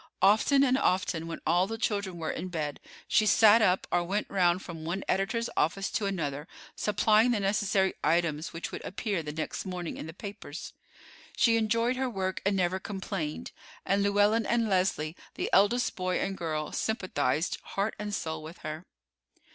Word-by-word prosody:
Often 220 Hz, +8 st, +5 dB
and 260 Hz, 0 st, +3 dB
often, 180 Hz, -7 st, 0 dB
when 165 Hz, -, -6 dB
all 175 Hz, +4 st, +3 dB
the 225 Hz, +2 st, -4 dB
children 200 Hz, -5 st, -1 dB
were 160 Hz, -1 st, -2 dB
in 185 Hz, -, -4 dB
bed, 155 Hz, -5 st, -3 dB, 0.3 s
she 215 Hz, -, +3 dB
sat 220 Hz, +1 st, +7 dB
up 185 Hz, -3 st, +3 dB
or 175 Hz, -, +2 dB
went 200 Hz, +4 st, -1 dB
round 180 Hz, -1 st, +2 dB
from 165 Hz, -3 st, -8 dB
one 175 Hz, +4 st, -3 dB
editor's 230 Hz, +5 st, 0 dB
office 195 Hz, +5 st, 0 dB
to 205 Hz, -, -1 dB
another 150 Hz, -6 st, -3 dB, 0.3 s
supplying 215 Hz, +3 st, +3 dB
the 235 Hz, -3 st, +2 dB
necessary 195 Hz, -1 st, +1 dB
items 165 Hz, -2 st, +1 dB
which 165 Hz, -, -5 dB
would -, -, -6 dB
appear 195 Hz, -1 st, -2 dB
the 150 Hz, -1 st, -5 dB
next 155 Hz, +1 st, -4 dB
morning 180 Hz, -3 st, -5 dB
in -, -, -6 dB
the -, -, -6 dB
papers. 190 Hz, -4 st, -8 dB, 0.6 s
She 230 Hz, -2 st, +4 dB
enjoyed 230 Hz, +3 st, +1 dB
her 260 Hz, -1 st, 0 dB
work 190 Hz, -4 st, -3 dB
and 200 Hz, -, +2 dB
never 185 Hz, 0 st, +1 dB
complained; 190 Hz, -6 st, -4 dB, 0.3 s
and 200 Hz, +1 st, +2 dB
Llewellyn 205 Hz, +2 st, +3 dB
and 235 Hz, -1 st, +2 dB
Leslie, 180 Hz, -5 st, 0 dB, 0.2 s
the -, -, -3 dB
eldest 235 Hz, +5 st, +3 dB
boy 185 Hz, -1 st, -1 dB
and 195 Hz, 0 st, -2 dB
girl, 155 Hz, -4 st, -3 dB
sympathized 185 Hz, -7 st, -1 dB
heart 200 Hz, +2 st, -2 dB
and 210 Hz, 0 st, -4 dB
soul 160 Hz, -6 st, -3 dB
with 160 Hz, +3 st, -9 dB
her. 155 Hz, +3 st, -6 dB
190 Hz, 175 wpm, -29 LUFS, 170-210 Hz, 0.6 s, sat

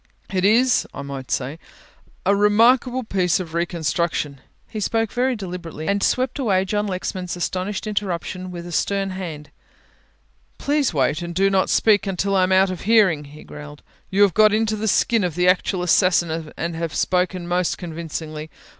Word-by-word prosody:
It 185 Hz, -1 st, 0 dB
is, 240 Hz, +6 st, +3 dB
I 140 Hz, -, -5 dB
might 135 Hz, -2 st, -7 dB
say, 140 Hz, +5 st, -2 dB, 0.7 s
a 200 Hz, +2 st, +4 dB
remarkable 235 Hz, +5 st, +3 dB
piece 185 Hz, -6 st, +1 dB
of 170 Hz, -3 st, -6 dB
reconstruction," 170 Hz, -4 st, -1 dB, 0.3 s
he 215 Hz, -, -6 dB
spoke 225 Hz, +1 st, 0 dB
very 255 Hz, +1 st, 0 dB
deliberately, 175 Hz, -6 st, -7 dB
and 200 Hz, 0 st, +1 dB
swept 255 Hz, +5 st, 0 dB
away 195 Hz, -7 st, +1 dB
John 205 Hz, +2 st, -1 dB
Lexman's 185 Hz, -1 st, -4 dB
astonished 185 Hz, +4 st, -3 dB
interruption 185 Hz, -3 st, -3 dB
with 175 Hz, -1 st, -7 dB
a 175 Hz, -, -8 dB
stern 195 Hz, +2 st, 0 dB
hand, 165 Hz, -6 st, -7 dB, 1.1 s
"please 290 Hz, -2 st, +1 dB
wait 145 Hz, +1 st, 0 dB
and 170 Hz, 0 st, -6 dB
do 195 Hz, +2 st, +3 dB
not 190 Hz, -1 st, +2 dB
speak 210 Hz, -2 st, +3 dB
until 195 Hz, +1 st, -1 dB
I 190 Hz, -, +4 dB
am 185 Hz, +1 st, +1 dB
out 190 Hz, 0 st, +4 dB
of 185 Hz, -, -6 dB
hearing," 195 Hz, -9 st, +3 dB
he 150 Hz, +2 st, -13 dB
growled. 150 Hz, 0 st, -11 dB, 0.3 s
"You 200 Hz, +2 st, +4 dB
have 200 Hz, -4 st, +3 dB
got 215 Hz, 0 st, +5 dB
into 220 Hz, 0 st, +1 dB
the 215 Hz, +1 st, -3 dB
skin 225 Hz, +1 st, +2 dB
of 175 Hz, -4 st, -2 dB
the 180 Hz, 0 st, +2 dB
actual 180 Hz, 0 st, +2 dB
assassin 170 Hz, -3 st, +2 dB
and 170 Hz, 0 st, -3 dB
have 165 Hz, -2 st, -4 dB
spoken 180 Hz, -1 st, 0 dB
most 175 Hz, 0 st, 0 dB
convincingly. 160 Hz, -2 st, -6 dB
185 Hz, 170 wpm, -22 LUFS, 170-205 Hz, 1.1 s, got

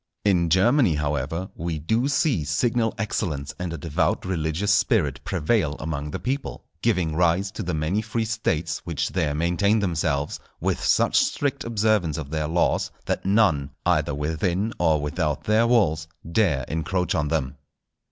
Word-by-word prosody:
In 90 Hz, -4 st, +3 dB
Germany, 100 Hz, -, +4 dB
however, 75 Hz, +4 st, -2 dB
we 85 Hz, -1 st, -3 dB
do 110 Hz, -, 0 dB
see 140 Hz, -, +1 dB
signal 115 Hz, +10 st, 0 dB
excellence 75 Hz, -10 st, -2 dB
and 90 Hz, -1 st, -3 dB
a 85 Hz, -, -4 dB
devout 75 Hz, 0 st, -1 dB
religious 90 Hz, +2 st, 0 dB
spirit 100 Hz, -, +1 dB
prevail 85 Hz, -3 st, 0 dB
among 75 Hz, -2 st, -4 dB
the -, -, -4 dB
people, 135 Hz, +2 st, -4 dB, 0.2 s
giving 90 Hz, -9 st, +1 dB
rise 90 Hz, +3 st, +2 dB
to 110 Hz, -, -6 dB
the 90 Hz, -4 st, -2 dB
many 80 Hz, +7 st, 0 dB
free 110 Hz, +1 st, -2 dB
States 85 Hz, -8 st, -1 dB
which 85 Hz, -4 st, -2 dB
there 80 Hz, -6 st, -1 dB
maintain 90 Hz, +7 st, +2 dB
themselves, 80 Hz, -6 st, -1 dB, 0.2 s
with -, -, -1 dB
such -, -, +3 dB
strict 145 Hz, 0 st, 0 dB
observance 105 Hz, -8 st, +1 dB
of 75 Hz, -3 st, -6 dB
their 80 Hz, -1 st, -1 dB
laws 85 Hz, +2 st, +1 dB, 0.2 s
that -, -, -2 dB
none, 95 Hz, -10 st, +3 dB, 0.2 s
either 75 Hz, -5 st, +2 dB
within 85 Hz, +8 st, -1 dB
or 80 Hz, -3 st, +3 dB
without 75 Hz, +1 st, -2 dB
their 110 Hz, +2 st, +3 dB
walls, 80 Hz, -10 st, +2 dB, 0.2 s
dare 80 Hz, -, +2 dB
encroach 85 Hz, +3 st, -1 dB
on 75 Hz, -1 st, 0 dB
them. 75 Hz, -5 st, -2 dB
85 Hz, 155 wpm, -24 LUFS, 75-105 Hz, 0.2 s, Germany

